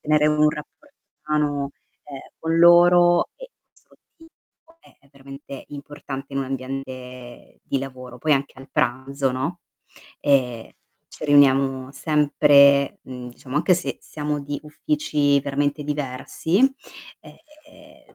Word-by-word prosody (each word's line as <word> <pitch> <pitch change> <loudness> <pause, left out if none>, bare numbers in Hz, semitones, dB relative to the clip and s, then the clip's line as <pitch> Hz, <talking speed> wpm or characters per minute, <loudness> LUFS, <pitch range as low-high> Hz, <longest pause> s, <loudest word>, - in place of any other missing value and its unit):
tenere 150 0 +3
un 150 0 +3
rapporto 280 - -11 0.3
umano, 145 -2 0 0.3
ehm, 140 -2 -9 0.2
con 165 0 -1
loro 175 0 +6
è 330 - -21
veramente 140 0 -11
importante 140 -1 -8
in 135 - 0
un - - -2
ambiente 130 -2 -8
di 135 - -2
lavoro, 130 -2 -9
poi 155 +4 +1
anche 140 -1 -4
a 135 - -13
pranzo, 135 +2 -1
no, 140 +8 -3 0.6
ehm, 125 -5 +1 0.4
ci - - -9
riuniamo 135 -2 +3
sempre, 140 -2 +4
mhmm, 125 -1 -9
diciamo 130 +3 -8
anche 180 +4 +3
se 175 - -4
siamo 150 -1 -4
di 145 0 -5
uffici 150 - 0
veramente 145 +1 -1
diversi, 145 +4 -2 0.6
ehm, 305 -1 -19
145 Hz, 110 wpm, -22 LUFS, 135-155 Hz, 0.6 s, loro